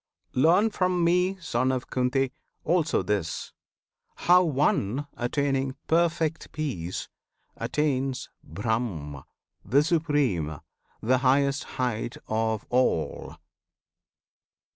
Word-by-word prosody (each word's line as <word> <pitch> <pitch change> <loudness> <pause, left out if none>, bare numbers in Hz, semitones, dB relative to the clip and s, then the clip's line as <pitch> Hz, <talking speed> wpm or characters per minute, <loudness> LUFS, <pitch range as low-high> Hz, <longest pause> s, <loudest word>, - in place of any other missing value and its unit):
Learn 175 +11 +4
from 185 -3 +1
me, 180 +3 +3
Son 130 -6 0
of 130 -1 -3
Kunti! 130 +1 +1 0.3
also 165 -1 +2
this, 100 -6 -2 0.6
How 180 +1 +5
one, 140 - +1
attaining 135 +1 0
perfect 165 -1 +1
peace, 120 - -4 0.5
attains 135 -3 -1 0.2
BRAHM, 85 - -3 0.4
the 135 +9 +3
supreme, 145 - +1 0.5
the 130 +3 +3
highest 140 +2 +2
height 120 -2 -2
of 110 0 -1
all! 125 -10 0
135 Hz, 90 wpm, -27 LUFS, 115-155 Hz, 0.6 s, How